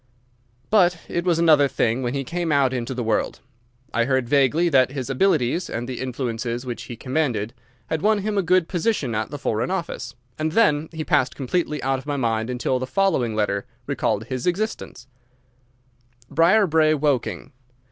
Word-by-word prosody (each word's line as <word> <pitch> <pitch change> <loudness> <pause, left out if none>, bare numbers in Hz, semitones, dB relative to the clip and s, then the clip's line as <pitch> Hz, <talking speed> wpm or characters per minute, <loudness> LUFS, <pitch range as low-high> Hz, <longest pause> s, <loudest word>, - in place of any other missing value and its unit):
But 180 -5 +4
it 170 +1 -2
was 175 -3 +2
another 155 -4 +5
thing 120 -2 0
when 125 +1 -2
he 135 - -1
came 170 +3 -2
out 140 -3 +3
into 125 +1 -3
the 125 - -2
world. 110 -1 -1 0.5
I 115 - +2
heard 130 -1 +1
vaguely 145 +5 +3
that 135 -4 +3
his 135 -2 -4
abilities 165 0 +1
and 120 +1 -4
the 130 -2 -5
influences 120 -1 -3
which 120 -2 -5
he 120 - -7
commanded 125 -4 -1 0.3
had 155 +6 -2
won 215 +1 +3
him 210 +1 -2
a 200 - +3
good 180 -1 +2
position 175 - -1
at 110 +1 -2
the 145 - -6
Foreign 115 -3 -1
Office, 180 -8 -4 0.2
and 155 0 -1
then 160 -9 +3
he 160 -1 -4
passed 140 -6 +2
completely 150 +2 -2
out 135 0 0
of 135 - -13
my 145 -1 -1
mind 115 -2 0
until 125 +1 -1
the 130 - -4
following 130 - +1
letter 105 +1 -1 0.2
recalled 125 -6 -1
his 130 +3 -4
existence: 190 - -3 1.3
Briarbrae, 165 -1 +4
Woking. 130 - -1
135 Hz, 175 wpm, -23 LUFS, 120-165 Hz, 1.3 s, another